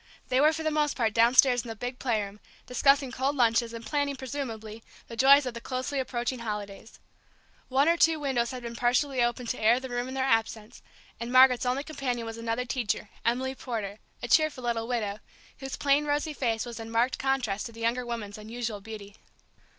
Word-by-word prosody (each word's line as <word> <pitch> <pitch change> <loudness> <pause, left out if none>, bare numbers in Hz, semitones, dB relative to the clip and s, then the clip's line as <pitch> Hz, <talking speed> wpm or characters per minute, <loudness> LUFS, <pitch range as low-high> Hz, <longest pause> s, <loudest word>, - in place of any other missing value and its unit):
They 255 +1 +3
were 305 +1 +6
for 320 0 -4
the 310 - 0
most 300 -1 0
part 225 -4 +1
downstairs 245 +2 +5
in - - -10
the 225 - -5
big 245 +3 -5
playroom, 210 -5 -2 0.3
discussing 275 +1 +3
cold 265 +4 -1
lunches, 235 -2 +2
and 230 -1 -8
planning, 285 -1 -1
presumably, 230 -5 -6 0.3
the 230 - -8
joys 275 +3 +6
of 250 - -3
the 235 - -7
closely 260 +3 -3
approaching 250 -1 -2
holidays. 210 -1 -6 0.7
One 270 +3 +3
or 335 +1 +4
two 325 -1 +4
windows 255 -5 0
had 250 -1 -7
been 235 0 -6
partially 250 +2 +1
opened 240 0 0
to 250 - -3
air 230 +3 +5
the 260 0 -7
room 245 0 -2
in 260 - -6
their 265 - 0
absence, 225 -3 -1 0.4
and 235 +1 -5
Margaret's 255 -1 +6
only 260 +3 0
companion 260 -6 -3
was 225 0 -6
another 230 +2 -2
teacher, 235 -4 -2
Emily 255 +3 0
Porter, 220 -6 -5 0.2
a - - -2
cheerful 305 0 +2
little 230 -1 -1
widow, 215 -4 -2 0.4
whose 270 -1 -5
plain 285 +1 +2
rosy 295 +1 -1
face 230 -5 -1
was 235 -1 -7
in 225 0 -7
marked 230 +3 +1
contrast 250 -7 -1
to - - -11
the 230 0 -11
younger 235 +2 0
woman's 225 -4 -5
unusual 220 -1 -5
beauty. 210 -1 -10
245 Hz, 200 wpm, -28 LUFS, 230-270 Hz, 0.7 s, were